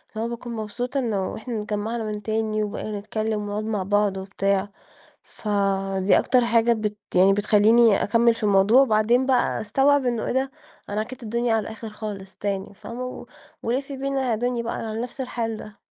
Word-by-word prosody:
اللي 220 - -2
هو - - -3
باكون 235 0 -6
مبسوطة 245 +5 -3
إنّه 210 -6 -1
إحنا 230 0 -4
اتجمعنا 215 +2 -3
من 210 -1 -4
تاني، 215 0 -1
وبقينا 210 0 -4
نتكلّم 215 +1 -2
ونقعد 205 +1 -3
مع 215 -3 -1
بعض 205 0 +1
وبتاع. 195 +1 -1 0.5
فدي 195 -2 +1
أكتر 250 -2 +3
حاجة 235 0 +3
بت 215 -2 -2 0.2
يعني 190 +2 +6
بتخليني 210 +2 +4
أكمل 230 +3 +3
في 225 - -10
الموضوع، 205 +5 +5
وبعدين 235 +1 +3
بقى 260 -2 +2
أستوعب 270 +5 +3
إنّه 235 -3 0
إيه - - -1
ده! 265 +1 0 0.4
أنا 205 +1 -1
عكّيت 245 +3 -6
الدنيا 235 +1 0
على 220 - +1
الآخر 220 +1 -7
خالص 205 -2 -7
تاني، 200 -1 -3
فاهمة؟ 235 +5 -7
و 255 - -7 0.4
ولفي 270 +4 -2
بينا 270 -1 -1
يا 220 - +2
دنيا 245 0 -1
بقى 230 - -3
على 220 0 -4
نفس 250 +2 -7
الحال 230 -3 -2
ده. 210 -1 -11
220 Hz, 180 wpm, -24 LUFS, 205-235 Hz, 0.5 s, يعني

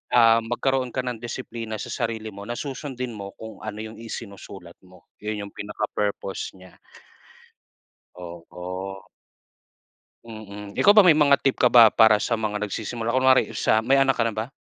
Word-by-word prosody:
ah, 115 -1 +6
magkaroon 125 +2 -1
ka - - -2
ng 125 -2 -4
disiplina 115 -2 -6
sa - - -6
sarili 115 -2 -3
mo 100 +1 -9
na 120 - -4
susundin 130 -4 -5
mo 100 -1 -7
kung 110 0 -10
ano 105 0 -6
yung 110 0 -9
isinusulat 100 -5 -9
mo, 90 -2 -20 0.2
yun 105 -1 -4
yung - - -16
pinaka-purpose 105 -2 -4
niya. 95 -1 -17 1.3
Oo. 90 +2 -8 1.2
Mm, 105 -2 -10
ikaw 205 - +6
ba 210 - +9
may 165 -5 +5
mga 145 -2 +5
tip 135 - +1
ka - - +3
ba 120 -2 +8
para 110 -1 +5
sa 115 0 0
mga 105 -1 -3
nagsisimula, 115 +3 -4
kunwari 130 -3 +3
sa 110 - +2
may 135 +4 +3
anak 135 0 +4
ka - - -2
na 115 - -1
ba? 115 +6 -4
110 Hz, 165 wpm, -24 LUFS, 100-125 Hz, 1.3 s, ba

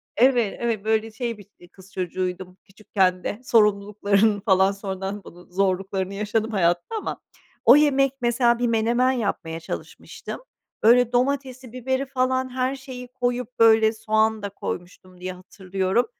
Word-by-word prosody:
Evet, 240 -4 +3
evet, 230 -4 -1
böyle, 220 0 +1
şey, 230 0 -4
bir 205 - -14
i 175 - -17
kız 190 +1 -18
çocuğuydum 185 0 -4
küçükken 190 -3 -1
de. 205 - -4
Sorumluluklarını 205 -2 +2
falan 190 -1 +3
sonradan 195 0 -5
bunun 175 +1 -15
zorluklarını 190 0 -1
yaşadım 215 +2 -1
hayatta 175 - 0
ama - - -5 0.4
o - - +9
yemek, 275 -2 +4
mesela, 240 0 +2
bir 245 - +1
menemen 235 +3 +2
yapmaya 200 -9 -3
çalışmıştım. 165 - -8 0.4
Böyle, 240 +2 +5
domatesi, 260 -1 -1
biberi 260 +2 -2
falan, 260 -1 0
her 255 +1 -1
şeyi 260 -2 -9
koyup, 245 -1 -2
böyle, 220 -1 +5
soğan 220 0 +1
da 200 - -4
koymuştum 180 -1 -8
diye 185 0 -4
hatırlıyorum. 190 +4 -2
220 Hz, 140 wpm, -23 LUFS, 190-245 Hz, 0.4 s, o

